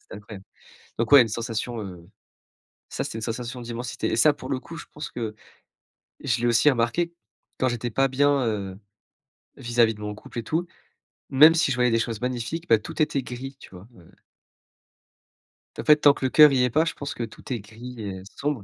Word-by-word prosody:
C'était - - -13
incroyable, 100 -1 -11 0.6
donc 115 - -1
ouais, 140 -3 +10
une 115 - +2
sensation, 115 +1 -4
heu, 90 -4 -10 0.8
ça - - -3
c'était 110 - -5
une - - -7
sensation 120 +2 -4
d'immensité 120 +1 -4
et - - +1
ça 145 +7 +5
pour 145 - -9
le 130 - 0
coup, 165 - -10
je - - -9
pense 150 0 -6
que 110 -3 -5 0.9
je - - 0
l'ai 120 - +1
aussi 120 +5 +5
remarqué, 135 +8 0 0.5
quand 130 - +2
j'étais 120 0 -3
pas 135 +5 +2
bien, 140 0 +2
heu, 100 -4 -3 0.8
vis-à-vis 120 -3 +2
de 105 - -13
mon 105 0 -4
couple 110 - -12
et - - -5
tout, 165 +9 -2 0.6
même 155 +5 +7
si 160 -4 +2
je 125 - -1
voyais 125 -1 +3
des 115 - +2
choses 115 -2 -3
magnifiques, 125 +7 -3
bah, 115 - +6
tout 110 - -6
était 145 -3 +1
gris, 130 +2 -7
tu - - -13
vois? 95 +2 -13
Ouais, 90 -7 -18
ouais. - - -20 1.7
En - - -4
fait, 150 - +6
tant 145 -1 +6
que 135 - -4
le - - +2
cœur 150 -1 +8
y 130 -2 +2
est 125 - +2
pas, 155 +7 +2
je 165 - -2
pense 145 - -6
que 120 - -5
tout 115 +3 -7
est 120 - -3
gris 115 +3 -10
et 95 -3 -6
sombre 140 -7 -2
120 Hz, 215 wpm, -25 LUFS, 110-140 Hz, 1.7 s, ouais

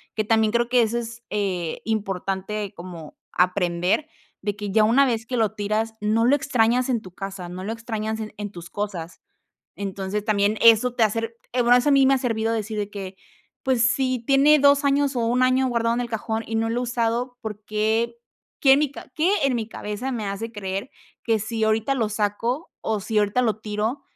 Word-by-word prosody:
que 215 - +1
también 220 0 +2
creo 235 0 +1
que 250 -1 +4
eso 230 +1 0
es, 235 0 -6
eh, 185 -5 -2
importante 200 -1 -3
como 170 -4 -10 0.2
aprender 180 - +1 0.3
de 205 0 -2
que 205 -1 -5
ya 215 +1 +4
una 265 +5 +5
vez 230 -3 -1
que 250 +2 -4
lo 220 -3 +2
tiras, 215 +2 -1
no 215 +2 +1
lo 270 +4 +5
extrañas 250 -2 +2
en 240 -4 +1
tu 185 - -12
casa. 195 -2 -6
No 185 +1 -7
lo 220 +3 -3
extrañas 220 -1 -4
en 215 -1 -5
en 205 -1 -5
tus 175 -3 -10
cosas. 190 -5 -5 0.6
Entonces, 200 +1 -4
también 210 0 +2
eso 230 +2 +6
te 235 - +3
hace 220 +1 +1
r 230 0 -5 0.2
eh, 250 - +2
bueno, 240 +1 +6
eso 250 +4 +2
a - - +4
mí 275 -1 +5
me 270 - +5
ha - - +2
servido 225 -3 -1
decir 220 -1 -2
de 205 - -3
que: 195 -2 -7 0.5
"Pues, 255 -3 +2
si 255 0 +2
tiene 280 +3 +5
2 280 0 +5
años 280 0 +2
o 245 - 0
1 250 +2 +2
año 255 +1 +3
guardado 230 -1 +1
en 245 - 0
el 240 - -4
cajón 220 0 -2
y 225 - -3
no 225 0 +1
lo 240 - 0
he - - -1
usado, 240 +1 -1
¿por 210 -1 -6
qué 220 +2 0 0.4
qué 270 - +5
en 280 - +4
mi 300 -3 0
ca 270 - -11
qué 325 +4 +2
en 275 - +3
mi 225 -1 -3
cabeza 215 +7 -4
me 225 -4 -3
hace 200 +3 -4
creer, 200 +2 -4 0.3
que 225 -2 +2
si 220 +1 -3
ahorita 220 +5 +2
lo 225 -5 0
saco 220 +8 -2
o 220 -2 -1
si 215 +2 0
ahorita 210 +5 +1
lo 220 -3 +1
tiro, 215 +5 -2
225 Hz, 220 wpm, -24 LUFS, 205-245 Hz, 0.6 s, eso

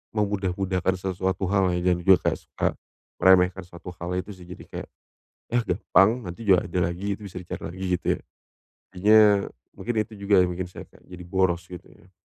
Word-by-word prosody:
memudah-mudahkan 95 -3 0
sesuatu 95 0 -2
hal 95 -2 +3
ya 90 +1 +1
dan 90 - -3
juga 95 +1 +6
kayak - - -5
suka - - -1 0.5
meremehkan 95 0 +5
sesuatu 90 +1 -10
hal 90 +1 -2
itu 100 +2 -7
sih, 90 - -14
jadi 90 0 -11
kayak, - - -7 0.6
"Yah 120 0 +1
gampang, 95 +1 +3 0.2
nanti 90 +6 -8
juga 95 -3 +3
ada 90 - -2
lagi, 95 +4 -2
itu 105 - -13
bisa 95 -2 -10
dicari 90 - -7
lagi," 95 +2 -7 0.2
gitu - - -5
ya. - - -14 0.7
Akhirnya 105 +1 +5 0.2
mungkin 115 -2 -2
itu 105 -1 -13
juga 100 -2 +4
yang 90 - 0
bikin 90 +1 -4
saya 90 - -10
kayak - - -20
jadi 90 -1 -10
boros 90 -1 0
gitu 90 -2 -9
ya. 90 - -21
95 Hz, 190 wpm, -25 LUFS, 90-100 Hz, 0.7 s, juga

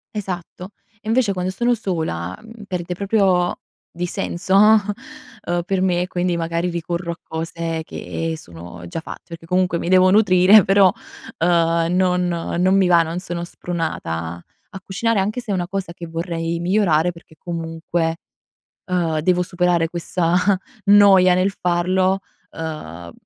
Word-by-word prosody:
Esatto. 185 -2 -6 0.3
E - - -13
invece 225 -2 +2
quando 180 0 -2
sono 240 +5 +1
sola, 160 - -3
mhmm, 225 -1 -12
perde 180 -1 -3
proprio 190 -3 +1 0.3
di 175 +1 -3
senso, 190 +2 -2 0.9
ehm, 175 0 -1
per 190 +1 -1
me 180 -1 +1
quindi 180 -1 -1
magari 170 +1 -1
ricorro 170 0 -3
a 170 - -8
cose 165 0 -4
che 165 +1 -4
sono 85 - -11
già 125 - -5
fatte - - -9
perché 165 0 -9
comunque 180 -1 +1
mi 170 - -3
devo 185 0 +5
nutrire 195 0 +6
però, 195 -1 +5 0.5
uhm, 165 -1 +2
non 180 -1 +2
non 175 +2 0
mi 190 -2 +4
va, 170 -1 +5
non 165 +2 -4
sono 175 -2 -5
spronata 85 - -4 0.3
a 195 - -9
cucinare 215 +3 -1
anche 210 +5 -1
se 230 - -14
è - - +1
una 175 -2 -1
cosa 190 -3 -4
che 170 - -8
vorrei 165 0 -3
migliorare 175 -2 +2
perché 165 -1 -17
comunque, 165 -1 -3 0.7
uhm, 170 -4 0
devo 180 +2 +2
superare 175 -2 +1
questa 170 0 -1 0.5
noia 200 -3 +6
nel 185 +2 +2
farlo, 185 +1 +1 0.3
uhm, 85 - -7
175 Hz, 145 wpm, -20 LUFS, 165-185 Hz, 0.9 s, nutrire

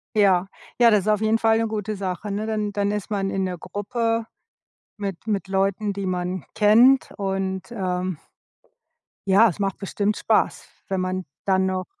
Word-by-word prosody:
Ja. 190 -3 +4 0.3
Ja, 235 -1 +7
das 210 -2 +4
ist 210 - -7
auf 210 0 +2
jeden 220 +1 +2
Fall 225 0 +3
'ne 225 0 +1
gute 215 -1 -3
Sache, 190 +1 -4
ne, 210 +2 -2
dann 215 -2 -2
dann 205 0 0
ist 210 -1 -4
man 195 -2 -1
in 190 -1 -1
der 180 -1 -4
Gruppe 225 +4 -2 0.7
mit 200 -2 -5
mit 200 -3 -1
Leuten, 195 +2 0
die 200 0 -4
man 180 -1 -2
kennt 235 +6 +5
und, 190 +1 -3
ähm 185 -4 -2 1.1
ja, 200 +4 +6
es 185 - -7
macht 195 -1 -1
bestimmt 205 +1 -1
Spaß, - - +1 0.2
wenn 190 -1 0
man 185 0 -2 0.2
dann 190 -1 +2
noch 185 0 -2
200 Hz, 175 wpm, -23 LUFS, 190-215 Hz, 1.1 s, Ja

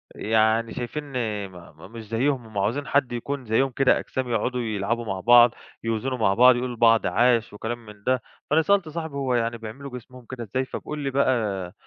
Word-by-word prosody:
يعني 110 +1 +1
شايفِيني 120 -5 -4
م 90 0 -14
مش 115 -2 -9
زيهم، 125 +3 0
هُم 110 -2 -10
عايزين 115 +9 -1
حد 140 -3 +1
يكون 130 +2 -4
زيهم 115 +5 +2
كده، 135 +1 +3
أجسام، 130 -1 -4
يقعُدوا 125 +2 -1
يلعبوا 115 +1 -2
مع 95 -3 -3
بعض، 120 +3 +7 0.3
يوزَنوا 115 +3 -2
مع 100 -4 +2
بعض، 125 +3 +6
يقولوا 125 0 -3
لبعض 115 -1 +4
عاش 120 -3 +2
وكلام 115 +2 -5
من 105 -1 -14
ده. 130 0 +1 0.3
فأنا 155 +2 +4
سألت 195 -1 +2
صاحبي، 160 -2 -5
هو 135 -2 -1
يعني 115 0 0
بيعملوا 120 +5 -8
جسمهم 125 +1 -14
كده 130 -2 -6
إزاي؟ 130 +5 -2
فبيقول 150 +3 -6
لي 140 -1 -2
بقى، 110 -9 0
120 Hz, 185 wpm, -24 LUFS, 110-130 Hz, 0.3 s, بعض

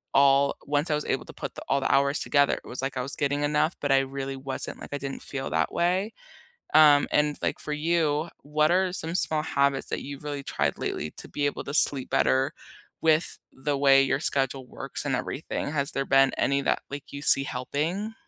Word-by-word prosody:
all 140 0 +4
once 145 +3 0
I - - +2
was 150 - -4
able - - -2
to - - -12
put - - -7
the - - -8
all 140 - +2
the - - 0
hours 140 +1 +2
together, 140 -1 +2
it - - -15
was 125 - -6
like 135 0 -4
I - - -1
was 140 - -2
getting 145 +1 -1
enough, 150 +3 +1
but 145 - -1
I 135 - +5
really 135 0 -4
wasn't, 135 0 -5
like, - - -10
I - - -1
didn't 135 0 -6
feel 135 -1 -5
that 80 0 0
way. 185 +5 0 0.6
Um, 150 -2 +6
and, 150 0 +1
like, - - -1
for 150 - -5
you, 155 0 0
what 150 +1 +1
are 185 0 +1
some 165 -1 -4
small 155 -5 +6
habits 140 -3 0
that - - -3
you've 140 +1 -9
really 145 -2 -5
tried - - -2
lately 75 - -4
to - - -9
be 145 - -2
able 145 - -4
to 140 - -6
sleep 140 -3 +4
better 130 +1 +1 0.5
with 160 0 +1
the 140 +1 -2
way 135 -1 +5
your 135 0 0
schedule 135 -3 -1
works 135 +3 -4
and 135 -3 0
everything? 145 +2 -4
Has 140 -1 0
there 135 - -2
been 135 0 +4
any 140 +1 +1
that, - - -1
like, 140 0 -8
you 140 - -6
see 135 -2 +8
helping? 155 - -3
140 Hz, 220 wpm, -26 LUFS, 135-150 Hz, 0.6 s, see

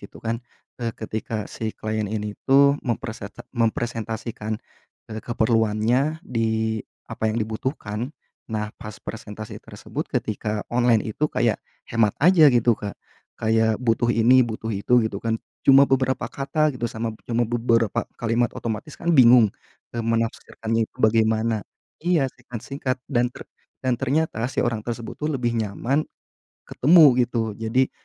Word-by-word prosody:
gitu - - -12
kan, 115 +1 -2 0.4
eee, 115 -1 -1
ketika 110 0 -4
si 110 -1 -4
klien 110 -1 -2
ini 105 -1 -3 0.2
tuh 140 +1 +6
mempreset 115 -4 -4 0.2
mempresentasikan, 115 -2 -2 0.5
eee, 110 0 -5
keperluannya 115 +7 +1
di 110 -2 0 0.3
apa 110 - -1
yang 110 - -1
dibutuhkan. 110 +2 -3 0.4
Nah, 105 -2 -3
pas 105 -1 -8
presentasi 110 -1 -8
tersebut - - -6
ketika 105 0 -2
online 120 -3 +3
itu 145 +8 -1
kayak 120 -6 +1 0.3
hemat 110 -3 +2
aja 165 -1 +7
gitu 120 -2 +4
Kak, 105 -2 -5 0.4
kayak 110 0 +2
butuh 120 0 +1
ini 120 +2 +5
butuh 115 -2 -2
itu 115 +4 +3
gitu 105 -2 -3
kan. 115 -1 0 0.3
Cuma 135 +1 +7
beberapa 130 -1 +1
kata 150 +2 0
gitu 120 -2 -3
sama 110 +1 -3
b 110 - -16
cuma 120 0 +2
beberapa 115 -2 +1
kalimat 115 +1 +1
otomatis 115 +6 -5
kan 170 0 0
bingung, 120 -6 +7 0.4
eee, 120 - -1
menafsirkannya 115 0 -1
itu - - -33
bagaimana 110 0 +2 0.4
iya 170 -4 +2
singkat-singkat 130 +2 -5
dan 125 -2 +2
ter - - -11 0.4
dan 130 -1 +2
ternyata 140 -2 0
si - - -8
orang 115 -3 0
tersebut 115 0 -5
tuh 150 - -1
lebih 120 -5 -1
nyaman 115 +6 0 0.7
ketemu, 150 -3 +6
gitu. 115 -2 -2
Jadi 115 +4 +1
115 Hz, 140 wpm, -24 LUFS, 110-125 Hz, 0.7 s, aja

